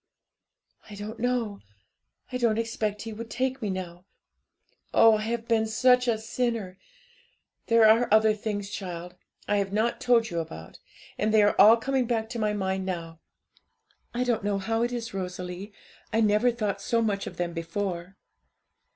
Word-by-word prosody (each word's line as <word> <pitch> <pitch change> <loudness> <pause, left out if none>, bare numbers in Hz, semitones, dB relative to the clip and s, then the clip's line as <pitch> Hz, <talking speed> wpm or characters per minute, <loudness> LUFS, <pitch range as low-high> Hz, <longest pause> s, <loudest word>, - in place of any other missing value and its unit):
'I 210 - -9
don't 210 +3 -7
know; 235 -4 -1 0.7
I 250 - -1
don't 230 -3 +1
expect 220 -2 -2
He 225 -1 -6
would 225 +2 -8
take 260 +2 -2
me 210 - -2
now; 180 -1 -6 0.9
oh, 225 -1 +7
I - - -4
have 230 +1 -3
been 220 -1 +2
such 250 +3 +3
a 230 -2 +2
sinner! 225 -4 -3 0.9
There 230 -1 +5
are 230 +2 +4
other 220 0 +5
things, 205 -1 -4
child, 180 -3 -6 0.3
I 205 - +2
have 195 -1 -1
not 220 +3 0
told 230 -3 +3
you 170 - -1
about; 80 - -8 0.4
and 215 +1 +1
they 215 -1 +5
are 205 - +4
all 225 +2 +8
coming 260 +1 0
back 225 -2 -1
to 235 0 -5
my 215 -1 +1
mind 190 -2 -2
now. 165 -3 -5 0.9
I 245 +1 -1
don't 235 -4 0
know 205 -1 0
how 225 +4 -1
it 240 +1 0
is, 240 -1 -5
Rosalie, 180 +1 -5 0.4
I 225 - +1
never 215 +2 +3
thought 210 -4 -2
so 230 +2 +1
much 200 -2 -1
of - - -8
them 175 -1 -2
before.' 175 +2 -4
215 Hz, 170 wpm, -27 LUFS, 195-230 Hz, 0.9 s, all